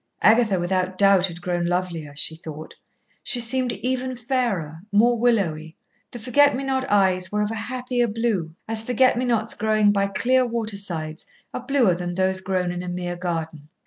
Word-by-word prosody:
Agatha 220 -3 +4
without 185 +1 -1
doubt 195 -1 +5
had 175 0 -10
grown 175 -1 -1
lovelier, 170 -4 -2
she 160 +2 -1
thought; 155 -1 -9 0.5
she 245 - -1
seemed 250 +1 +1
even 255 0 -2
fairer, 225 - -2
more 230 +4 +4
willowy, 180 -10 0 0.3
the - - -9
forget 285 +5 +3
me 270 - -3
not 265 -1 -1
eyes 190 -2 +2
were 210 0 0
of 210 - -2
a - - -3
happier 245 +2 -2
blue, 210 -8 -2
as 225 0 +1
forget 250 +3 +3
me 250 +2 -1
nots 225 -2 0
growing 215 -1 +2
by 200 -1 +1
clear 255 +6 +2
water 230 -3 -2
sides 165 -5 -6 0.3
are - - -4
bluer 265 -9 +3
than 175 0 -4
those 190 0 +1
grown 185 -1 -1
in 175 0 -4
a 180 - -7
mere 175 0 -4
garden. 160 -4 -4
200 Hz, 180 wpm, -23 LUFS, 175-240 Hz, 0.5 s, doubt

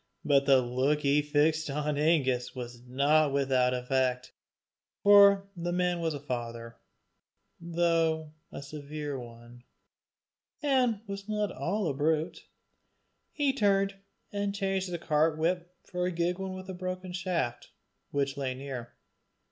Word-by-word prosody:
But 140 -1 +3
the 135 -2 +6
look 130 +5 +1
he 140 0 +3
had 150 0 0
fixed 155 +1 +2
on 150 +1 -1
Angus 140 -6 +1
was 120 -1 -7
not 145 +4 +3
without 130 -2 +2
effect, 125 0 0 0.7
for 200 -1 +7
the 175 0 -3
man 180 0 +1
was 165 -2 -1
a - - -5
father, 115 -3 -5 0.8
though 165 -2 0 0.2
a - - -7
severe 145 0 -6
one, 120 0 -12 1.0
and 255 -7 +2
was 200 0 -7
not 210 -2 0
all 200 +2 -1
a 145 - 0
brute: 155 +3 -1 0.8
he 285 -2 +1
turned 195 -5 +2 0.4
and 200 0 -1
changed 195 -2 -1
the 175 - -2
cart 155 -1 +1
whip 175 +2 -1
for 180 -1 -2
a - - -1
gig 175 +1 -1
one 190 -1 -4
with 185 0 -8
a 190 - -5
broken 185 0 -5
shaft, 170 -10 -2 0.4
which 140 0 -1
lay 130 -2 -2
near. 130 -3 -7
155 Hz, 140 wpm, -29 LUFS, 135-185 Hz, 1.0 s, for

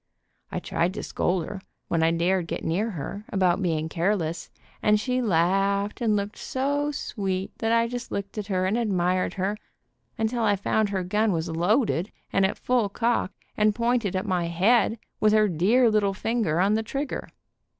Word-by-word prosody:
I - - -3
tried 175 +3 -1
to - - -4
scold 180 -2 -1
her, 190 +2 -7 0.3
when 165 - 0
I 160 - +4
dared 170 +1 +1
get - - -4
near 195 +8 0
her, 200 +2 -6
about 185 -1 +2
being 160 -4 0
careless, 170 -1 -1 0.3
and 210 -1 +4
she 255 +3 0
laughed, 200 +2 +1
and 220 -3 +2
looked 205 +1 -3
so 285 +2 -1
sweet 195 -9 -3
that 225 0 0
I 230 0 +3
just 245 +1 -6
looked 200 0 -4
at 205 - -5
her 185 -2 0
and 205 +5 +1
ad 230 -3 0
mired 185 -1 +1
her, 195 +2 -1 0.6
until 225 +2 0
I 205 -2 +3
found 205 +2 0
her 190 -2 -1
gun 210 +4 +1
was 165 -1 -1
loaded 180 - +1 0.2
and 195 -1 +4
at - - -5
full 245 -5 +1
cock, 230 -1 0 0.2
and 210 0 +2
pointed 235 -4 0
at 185 - -1
my 180 -4 0
head, 210 +7 +3 0.2
with 215 0 +4
her 215 -1 +5
dear 205 +9 +3
little 200 -2 +2
finger 215 -7 0
on 195 +3 +3
the 220 - +2
trigger. 275 +5 -4
200 Hz, 185 wpm, -26 LUFS, 180-225 Hz, 0.6 s, her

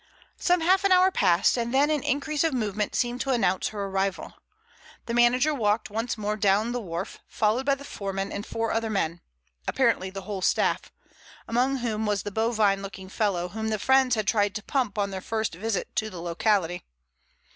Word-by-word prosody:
Some 355 -1 +2
half 375 +4 +3
an 395 - +2
hour 370 +1 +6
passed, 185 - +3
and 235 0 -1
then 280 +3 +3
an 300 -2 +1
increase 290 +3 0
of 320 -4 +1
movement 210 -3 -2
seemed 245 0 0
to 275 - -3
announce 195 -8 +1
her 205 -2 -4
arrival. 195 -1 -2 0.7
The 235 - -4
manager 245 +5 +4
walked 215 -4 0
once 225 +3 -2
more 210 0 -2
down 210 +2 +2
the 245 0 -2
wharf, 175 -2 -5
followed 225 +5 0
by 275 - +4
the 280 - -12
foreman 195 -5 -4
and 200 - -4
four 225 +1 -2
other 225 0 -1
men—apparently 160 - -2
the 195 0 -7
whole 200 -3 -5
staff—among 250 +7 -1
whom 220 -3 -2
was 205 -2 0
the 205 - -5
bovine 215 -2 +1
looking 190 -1 -8
fellow 190 -4 -1
whom 220 +3 -4
the 220 -1 0
friends 260 +2 +3
had 215 -2 -1
tried 205 -3 +2
to 215 - -4
pump 245 -6 -1
on 200 -1 0
their 190 -1 -5
first 220 -1 -2
visit 200 +3 -3
to 220 0 0
the 180 - -8
locality. 175 +1 0
215 Hz, 190 wpm, -26 LUFS, 195-245 Hz, 0.7 s, hour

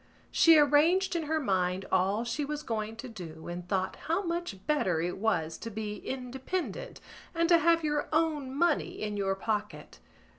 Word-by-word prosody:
She 330 -1 +7
arranged 320 +6 +4
in 330 -2 -1
her 315 0 +2
mind 185 -6 0
all 195 +4 +2
she 240 +5 -2
was 300 +1 -4
going 220 -2 -3
to 230 +3 -7
do 170 -8 -9
and 175 +1 -6
thought 190 -2 -1
how 335 +5 +1
much 335 - -4
better 190 - +1
it 175 +3 -2
was 165 -7 0
to 230 - -6
be 210 -1 -4
independent 265 - -4 0.4
and 335 0 +2
to 340 -1 +7
have 335 +1 +3
your 295 -1 -1
own 310 -4 +1
money 335 +1 +1
in 210 -1 -3
your 195 -1 0
pocket. 210 +1 -4
245 Hz, 175 wpm, -30 LUFS, 195-315 Hz, 0.4 s, She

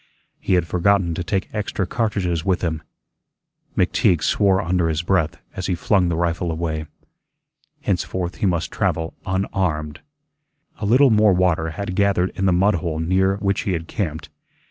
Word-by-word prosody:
He 95 - +1
had 90 -2 +2
forgotten 90 +1 +2
to 85 - -3
take 95 +1 -1
extra 105 -2 -2
cartridges 90 -6 -1
with 95 0 0
him. 80 -2 -1 1.0
McTeague 85 -4 +2
swore 95 -2 +3
under 85 -1 +1
his 80 +1 -1
breath 85 -4 +1 0.2
as 95 - -3
he 90 - 0
flung 90 +2 +2
the 85 - 0
rifle 85 0 -1
away. 80 -1 -3 0.9
Henceforth 90 -1 -2
he 100 - +1
must 85 -3 -1
travel 80 0 -1
unarmed. 90 -6 -1 0.8
A 100 - -2
little 130 +4 +5
more 105 -2 +5
water 90 -3 +1
had 90 +4 -5
gathered 95 -2 +2
in 95 - -1
the - - +4
mud 95 +4 +3
hole 85 -3 -2
near 95 +4 +2
which 100 -1 0
he 95 - -1
had 80 -1 -4
camped. 80 -8 -4
90 Hz, 165 wpm, -21 LUFS, 80-95 Hz, 1.0 s, little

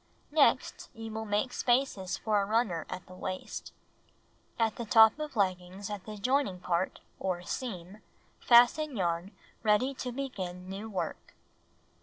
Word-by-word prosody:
Next 300 -1 +2
you 225 0 -7
will 220 0 -4
make 210 +4 0
spaces 240 -7 +1
for 210 -2 +1
a - - 0
runner 210 -6 0
at 185 - -6
the 185 - -13
waist. 185 0 -5 0.9
At 225 -2 +1
the 235 - -4
top 220 +4 +6
of 305 -3 -5
leggings 185 0 -1
at 205 -3 -6
the 215 -1 -6
joining 250 -3 +1
point, 175 +1 -1 0.2
or 180 -2 -2
seam, 190 -3 -5 0.4
fasten 245 +3 +5
yarn 170 0 -1 0.3
ready 230 +5 +3
to 255 -1 -5
begin 190 -9 -5
new 200 +4 -6
work. 195 -4 -5
210 Hz, 145 wpm, -30 LUFS, 185-240 Hz, 0.9 s, top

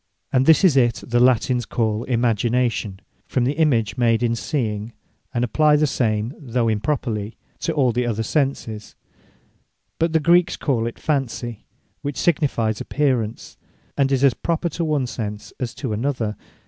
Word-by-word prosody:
And 130 0 +3
this 160 +2 +6
is 175 -7 +5
it, 120 -3 +2
that 120 0 +1
Latines 125 -1 +3
call 110 -1 -1
Imagination, 115 -3 0 0.3
from 125 - 0
the 125 - +2
image 120 -10 +1
made 115 -1 +3
in 115 -1 +1
seeing; 115 -5 -3 0.4
and 120 - -1
apply 150 +5 +3
the 150 +1 +3
same, 115 -3 0
though 125 -5 -1
improperly, 110 -2 -2 0.2
to 165 - -1
all 135 -5 +2
the 120 +1 -1
other 115 -1 -1
senses. 115 -5 -2 1.0
But 165 0 +2
the 160 - +4
Greeks 175 +3 +3
call 115 -6 0
it 115 - -6
Fancy; 125 -6 -2 0.4
which 145 -1 -4
signifies 125 -10 +1
Apparence, 125 -7 -1 0.4
and 135 -1 +1
is 135 0 +2
as 135 -3 +5
proper 170 +7 -1
to 170 +2 -3
one 150 -4 0
sense, 105 -3 -6
as 125 -3 -4
to 130 -6 -3
another. 115 -2 -1
125 Hz, 160 wpm, -22 LUFS, 115-145 Hz, 1.0 s, this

